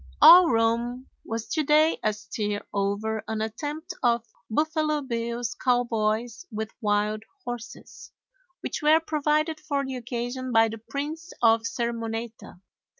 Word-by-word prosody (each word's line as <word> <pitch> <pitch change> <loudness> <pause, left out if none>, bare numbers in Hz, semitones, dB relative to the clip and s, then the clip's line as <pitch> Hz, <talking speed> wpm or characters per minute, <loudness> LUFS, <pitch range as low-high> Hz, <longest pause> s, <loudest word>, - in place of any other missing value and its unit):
All 355 0 +10
Rome 235 +2 +1 0.2
was 225 0 -4
to 315 - +1
day 305 +2 +4
astir 210 -1 -2
over 205 +2 -1
an 220 -1 -2
attempt 290 +10 -4
of 235 -2 +2 0.2
Buffalo 305 +3 0
Bill's 235 -2 -3
cowboys 235 0 0
with 220 0 -4
wild 210 0 +1 0.2
horses, 240 -1 -8 0.5
which - - -4
were 305 +1 +5
provided 305 0 0
for 285 -2 -2
the 265 -1 -4
occasion 245 +1 -4
by 225 -1 +5
the 225 0 -7
Prince 300 +8 -5
of 225 0 +4
Sermoneta. 230 -4 -4
235 Hz, 125 wpm, -26 LUFS, 220-295 Hz, 0.5 s, All